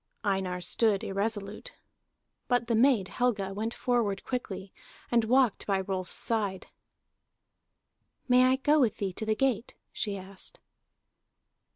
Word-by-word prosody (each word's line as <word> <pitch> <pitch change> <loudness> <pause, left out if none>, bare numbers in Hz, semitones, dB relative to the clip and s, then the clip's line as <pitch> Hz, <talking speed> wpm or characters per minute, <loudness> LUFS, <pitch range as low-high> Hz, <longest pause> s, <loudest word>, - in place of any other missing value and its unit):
Einar 190 -2 0
stood 210 +3 +1
irresolute. 205 - -3 0.7
But 245 -1 +2
the 230 - 0
maid 230 -4 +4
Helga 205 -6 -1
went 220 +3 -2
forward 230 -6 0
quickly 200 -6 -5 0.4
and 235 -2 +3
walked 250 -1 +2
by 195 -2 +1
Rolf's 185 -1 -3
side. 205 -5 0 1.6
"May 250 0 +6
I 255 +1 +4
go 295 +3 +3
with 245 -6 +2
thee 195 -2 -2
to 220 - -4
the 215 - +2
gate?" 250 -2 0 0.2
she 205 -2 -2
asked. 195 - -9
215 Hz, 130 wpm, -29 LUFS, 195-245 Hz, 1.6 s, May